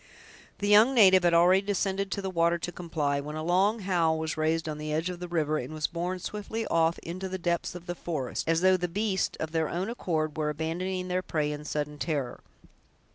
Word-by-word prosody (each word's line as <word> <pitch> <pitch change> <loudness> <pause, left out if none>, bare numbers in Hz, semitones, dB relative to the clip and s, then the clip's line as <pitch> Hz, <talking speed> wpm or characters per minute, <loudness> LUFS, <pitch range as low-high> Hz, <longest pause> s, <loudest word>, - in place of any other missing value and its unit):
The 205 - -2
young 215 +6 +6
native 190 -5 +7
had 170 -1 +4
already 180 +3 +5
descended 195 -1 -1
to 200 - -3
the 190 - -2
water 170 -1 +2
to 175 +1 -4
comply, 160 -5 -2
when 150 +2 -6
a 155 - -4
long 195 +6 +2
howl 170 -4 +1
was 160 0 -3
raised 160 +1 0
on 150 -1 -4
the 150 0 -4
edge 160 +4 -1
of 175 - -8
the 180 - -5
river, 155 -3 0
and 155 - -6
was 155 -1 -1
borne 175 +2 -2
swiftly 210 +4 -4
off 165 -2 +2
into 185 +3 -5
the 190 - -3
depths 175 -1 -1
of 175 -1 -9
the 175 - -3
forest, 160 -4 -4
as 165 0 +2
though 185 0 +5
the 180 0 -2
beasts, 195 +1 -1
of 160 - -3
their 160 -1 0
own 185 +6 -2
accord, 155 -9 -2
were 150 -1 0
abandoning 180 +5 -3
their 180 0 0
prey 150 -4 -1
in 150 0 -6
sudden 150 -1 -3
terror. 140 -7 -2
170 Hz, 225 wpm, -28 LUFS, 155-185 Hz, -, native